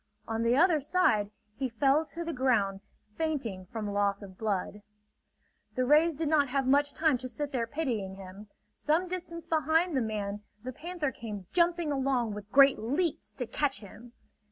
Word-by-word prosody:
On 225 0 -2
the 235 +2 +3
other 335 0 +5
side 265 - +2 0.3
he 265 +1 -2
fell 270 +6 +3
to 335 +3 -6
the 335 - -3
ground 220 -7 +1 0.4
fainting 245 - -2
from 210 0 -4
loss 200 0 0
of 190 -2 -11
blood. 205 0 -2 0.9
The 255 - +1
rays 310 +4 +4
did 320 +2 -2
not 290 -2 +3
have 270 +1 0
much 285 +2 +3
time 310 -6 +2
to 255 - -5
sit 285 +4 -4
there 235 -3 -1
pitying 230 -10 -3
him. 195 +2 -11 0.3
Some 320 +5 0
distance 340 -2 -5
behind 325 +1 +2
the 260 - +2
man 210 -2 -3 0.2
the 255 +1 -5
panther 325 -1 -3
came 210 -6 -7
jumping 340 -2 +2
along 260 -5 0
with 205 0 -9
great 275 0 +6
leaps 290 +9 -1
to 250 - -4
catch 275 +2 -1
him. 225 +4 -13
265 Hz, 175 wpm, -30 LUFS, 215-310 Hz, 0.9 s, great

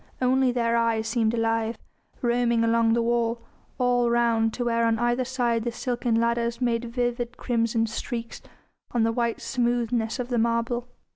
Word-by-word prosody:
Only 255 0 +3
their 235 -1 +1
eyes 225 -1 +1
seemed 225 -1 +1
alive, 225 0 0 0.5
roaming 235 -1 +2
along 230 0 +3
the 235 0 +2
wall, 235 0 0 0.4
all 245 -1 +2
round 230 -1 +2
to 245 - -2
where 230 -1 +1
on 230 -1 +2
either 240 +2 +1
side 240 -3 0
the 240 - -2
silken 240 -1 -1
ladders 235 0 0
made 240 -1 0
vivid 240 0 -2
crimson 230 -2 0
streaks 230 +1 -5 0.5
on 235 -2 +2
the 225 - +2
white 235 0 -1
smoothness 240 -2 0
of 250 -1 -4
the 240 -2 +1
marble. 235 +1 0
235 Hz, 160 wpm, -25 LUFS, 230-245 Hz, 0.5 s, Only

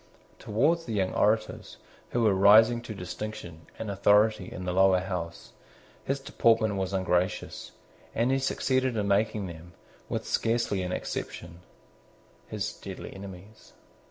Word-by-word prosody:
Towards 165 +11 +1
the 115 - -4
young 95 -2 0
orators, 110 +1 0 0.3
who 120 - 0
were 105 -3 +4
rising 110 +5 +6
to 115 -2 -7
distinction 90 -3 -7
and 110 -2 -4
authority 105 0 +3
in 90 - -6
the 90 - -1
Lower 95 0 +5
House, 90 -3 -5 0.5
his 135 +1 -1
deportment 115 -5 +2
was 95 -1 -2
ungracious: 95 -1 -1 0.4
and 120 +3 +2
he 135 - +2
succeeded 130 -2 0
in 105 -1 0
making 100 0 +1
them, 85 0 -10 0.4
with - - -3
scarcely 115 -4 0
an 90 0 -3
exception, 85 -1 -5 0.9
his - - -3
deadly - - -8
enemies. 95 +2 -12
100 Hz, 135 wpm, -28 LUFS, 95-115 Hz, 0.9 s, rising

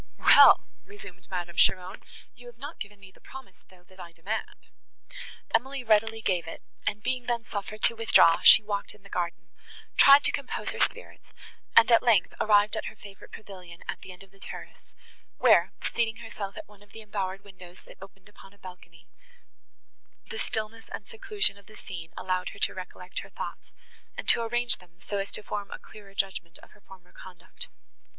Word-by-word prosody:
"Well!" - - +7 0.2
resumed 185 - -13
Madame 175 -2 -5
Cheron, 185 0 +2 0.3
"you 245 -1 -15
have 240 -1 -13
not 285 +6 -9
given 205 -1 -8
me 195 -1 -15
the - - -24
promise, 265 0 -13
though, 180 -1 -20
that 185 +1 -22
I 170 - -9
demand." 185 +7 -6 0.9
Emily 265 +3 0
readily 225 0 +2
gave 175 -4 0
it, 165 - -9 0.2
and, 210 +1 -2
being 255 -2 -2
then 235 -2 -1
suffered 210 +1 -6
to 230 - +4
withdraw, 220 -7 +5
she - - +9
walked 205 -1 -4
in 210 - -22
the 200 - -15
garden; 175 -1 -4 0.5
tried 280 +1 +8
to - - +4
compose 275 -2 -4
her - - -7
spirits, - - -2 0.5
and, 230 +1 +7
at 230 - +7
length, 225 -7 +3
arrived 210 0 +4
at 220 - -4
her - - -7
favourite 200 -1 -14
pavilion 180 -5 -12
at - - -5
the 185 - -10
end 180 +1 -12
of 195 - -20
the 195 - -22
terrace, - - -11 0.5
where, - - +5
seating 225 -1 -1
herself 215 -4 -7
at 320 - -8
one 205 -1 -20
of 205 -1 -21
the 225 - -10
embowered 195 -2 -4
windows, 185 -2 -14
that - - -17
opened 195 0 -14
upon 200 -1 -17
a - - -23
balcony, 180 -4 -14 1.3
the 460 - -5
stillness 225 - -3
and 200 - -7
seclusion 410 - 0
of 200 - -22
the 215 - -15
scene 170 -6 -9
allowed 185 0 -2
her 200 - -12
to - - +1
recollect 180 0 -7
her - - -10
thoughts, - - -8 0.5
and - - -6
to - - +4
arrange 240 +1 0
them 180 0 -22
so 200 +2 -4
as 195 - -4
to 215 - -6
form 205 -1 -5
a - - -7
clearer 200 -2 -15
judgment 185 -3 -3
of - - -16
her 210 - -21
former 185 -2 -17
conduct. 180 -2 -11
200 Hz, 195 wpm, -27 LUFS, 185-225 Hz, 1.3 s, she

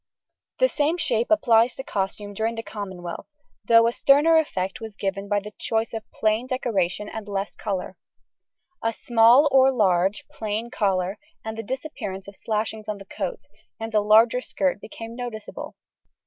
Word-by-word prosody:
The - - +5
same 315 -5 0
shapes 235 -8 0
apply 235 -8 +5
to 260 +1 -8
costume 205 -1 -3
during 225 +3 -1
the 225 - -5
Commonwealth, 190 -5 -7 0.4
though 230 +1 +6
a 230 - +3
sterner 295 +6 +5
effect 195 -6 -3
was 220 -2 -7
given 195 0 -3
by 205 -1 +2
the 210 +1 -10
choice 225 +1 -1
of 225 -1 -6
plain 220 +3 0
decoration 210 -6 -1
and 220 -1 -7
less 200 0 -3
colour. 190 -3 -4 0.9
A 225 0 +1
small 235 +6 +5
or 265 0 +6
a - - +4
large 195 -4 +2
plain 220 +2 -4
collar, 190 -3 0 0.3
and 220 0 -4
the 225 - -4
disappearance 205 -6 -5
of 200 - -10
slashings 215 0 -3
on 210 - -2
the 195 - -11
coat, 465 - -4 0.4
and 225 0 -5
a 210 - +4
longer 225 +4 +5
skirt 270 -4 -1
became 225 +1 -8
noticeable. 240 -3 -7
220 Hz, 165 wpm, -24 LUFS, 200-240 Hz, 0.9 s, though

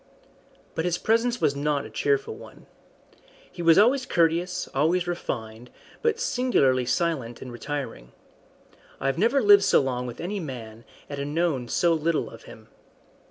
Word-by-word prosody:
But 160 - -2
his 175 -1 0
presence 235 +4 +1
was 140 - +1
not 145 -1 -1
a - - -9
cheerful 140 +3 0
one. - - -14 0.9
He - - -8
was 165 -1 +5
always 255 +6 +4
courteous, 175 +2 +1
always 165 +6 +1
refined, 120 -9 -5 0.3
but 460 -1 +1
singularly 185 - +1
silent 130 -5 -1
and 130 - -8
retiring. 135 - -6 0.9
I - - -6
have 135 +4 0
never 235 +6 +3
lived 205 -1 +7
so - - +4
long 125 -2 -2
with 120 - -8
any 200 +4 -3
man 115 - -8 0.2
and 140 +1 -5
known 160 -8 0
so 170 +7 +2
little 165 0 -1
of - - -13
him. - - -14
155 Hz, 155 wpm, -25 LUFS, 130-180 Hz, 0.9 s, lived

